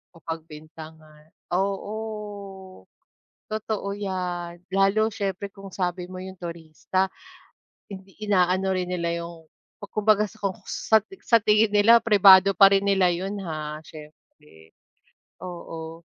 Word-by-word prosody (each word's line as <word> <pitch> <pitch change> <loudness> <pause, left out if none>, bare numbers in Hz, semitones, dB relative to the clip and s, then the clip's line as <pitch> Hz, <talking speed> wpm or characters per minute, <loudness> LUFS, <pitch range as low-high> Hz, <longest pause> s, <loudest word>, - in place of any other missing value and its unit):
O - - -14
pagbintangan, 155 -1 -10 0.2
oo, 195 +3 -1 1.5
totoo 215 -2 -3
'yan. 180 -3 -4 0.2
Lalo 205 +3 +2
siyempre 195 -1 -3
kung 195 -1 -11
sabi 180 -1 -3
mo 185 - -8
'yong 185 0 -9
turista, 170 +2 -2 0.8
hindi 190 -1 -12
inaano 190 -2 +1
rin 180 -1 -2
nila 170 -1 -2
'yong 170 -1 -10 0.3
ku 205 - -8
kumbaga 215 0 +3
sa 215 - -16
kung 195 -2 -2
sa 220 - +2
ti 220 - -13
sa 230 - +4
tingin 210 0 +3
nila, 215 +3 +6
pribado 195 -3 +7
pa 195 0 +8
rin 195 - +3
nila 195 -2 +3
'yon, 195 +4 -4
ha? 155 -1 -5
Siyempre, 150 - -16 0.7
oo, 165 -2 -8
185 Hz, 125 wpm, -25 LUFS, 170-200 Hz, 1.5 s, pa